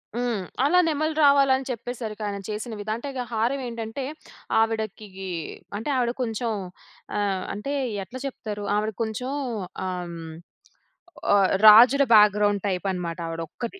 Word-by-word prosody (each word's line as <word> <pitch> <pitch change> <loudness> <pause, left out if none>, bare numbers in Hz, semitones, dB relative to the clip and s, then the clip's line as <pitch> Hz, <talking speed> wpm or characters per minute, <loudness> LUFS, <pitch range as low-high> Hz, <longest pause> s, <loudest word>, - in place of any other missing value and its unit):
హ్మ్. 240 -5 -1 0.2
అలా 355 +6 +4
నెమళ్ళు 310 0 0
రావాలని 280 -1 +5
అని 265 0 -4
చెప్పేసరికి 225 -2 -6
ఆయన 200 - -3
చేసిన 215 +2 -4
విధ 205 +1 -6
అంటే 260 +5 -6
గా 250 - -1
హారం 230 +5 0
ఏంటంటే, 230 +3 -5 0.6
ఆవిడకీ 220 -2 -1 0.7
అంటే 225 +7 -4
ఆవిడ 245 -2 +1
కొంచెం 230 0 -1 0.7
ఆహ్, 195 -2 0
అంటే 245 +8 -4 0.3
ఎట్లా 255 +7 -9
చెప్తారు? 210 -6 -5
ఆవిడ 215 +1 0
కొంచెం 220 +4 -4 0.6
ఆహ్, 180 -1 -3
హ్మ్. 165 -1 -8 1.0
ఆహ్, 195 -2 +4 0.2
రాజుల 245 +6 +9
బ్యాగ్రౌండ్ 205 -1 +5
టైప్ 185 0 -2
అనమాట 175 -2 -4
ఆవిడొక్కది. 165 - -6
220 Hz, 135 wpm, -25 LUFS, 205-250 Hz, 1.0 s, రాజుల